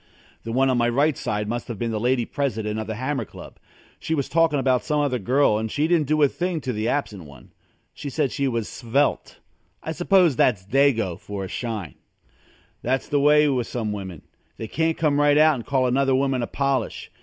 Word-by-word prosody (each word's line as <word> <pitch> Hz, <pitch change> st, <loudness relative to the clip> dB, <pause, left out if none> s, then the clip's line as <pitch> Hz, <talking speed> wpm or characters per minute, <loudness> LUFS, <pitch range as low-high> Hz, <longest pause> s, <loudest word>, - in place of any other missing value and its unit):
The 115 Hz, -, -6 dB
one 130 Hz, +2 st, +2 dB
on 125 Hz, -, +1 dB
my 120 Hz, 0 st, +2 dB
right 140 Hz, +5 st, +2 dB, 0.3 s
must 120 Hz, +2 st, -4 dB
have 115 Hz, -, -5 dB
been 115 Hz, +2 st, -2 dB
the 110 Hz, -, -2 dB
Lady 120 Hz, +1 st, +1 dB
President 110 Hz, -7 st, -2 dB
of 110 Hz, -, -5 dB
The 110 Hz, -, -4 dB
Hammer 130 Hz, +2 st, -2 dB
Club. -, -, -12 dB, 0.4 s
She 160 Hz, -, -2 dB
was 140 Hz, -3 st, -2 dB
talking 165 Hz, -2 st, +2 dB
about 130 Hz, -2 st, +1 dB
some 150 Hz, -1 st, 0 dB
other 140 Hz, -4 st, 0 dB
girl 125 Hz, 0 st, +2 dB
and 110 Hz, 0 st, -3 dB
she 150 Hz, +2 st, 0 dB
didn't 165 Hz, -4 st, +2 dB
do 155 Hz, +1 st, +2 dB
a -, -, +7 dB
thing 175 Hz, +3 st, -3 dB
to 130 Hz, -1 st, -3 dB
the 110 Hz, +1 st, -2 dB
absent 105 Hz, -, -2 dB
one. 70 Hz, -3 st, -16 dB, 0.4 s
She 145 Hz, -, -6 dB
said 140 Hz, -1 st, -1 dB
she 140 Hz, -, -1 dB
was 115 Hz, -4 st, -2 dB
svelte. 135 Hz, +5 st, -1 dB, 0.5 s
I 160 Hz, -, -4 dB
suppose 175 Hz, -2 st, +3 dB
that's 100 Hz, -7 st, +2 dB
Dago 115 Hz, -7 st, +1 dB
for 100 Hz, -1 st, -6 dB
a -, -, -5 dB
shine. 110 Hz, -5 st, -5 dB, 0.9 s
That's 130 Hz, +2 st, -1 dB
the 145 Hz, -, +2 dB
way 150 Hz, +1 st, +5 dB
with 125 Hz, -5 st, 0 dB
some 110 Hz, -4 st, -3 dB
women. 95 Hz, -6 st, -7 dB, 0.3 s
They 110 Hz, -, -6 dB
can't 160 Hz, +6 st, 0 dB
come 145 Hz, -3 st, +1 dB
right 145 Hz, 0 st, +4 dB
out 155 Hz, +1 st, +6 dB
and 120 Hz, -5 st, -6 dB
call 135 Hz, -2 st, +1 dB
another 135 Hz, +1 st, +2 dB
woman 135 Hz, -1 st, +1 dB
a 120 Hz, -, -2 dB
polish. 140 Hz, -1 st, -2 dB
130 Hz, 210 wpm, -23 LUFS, 115-145 Hz, 0.9 s, a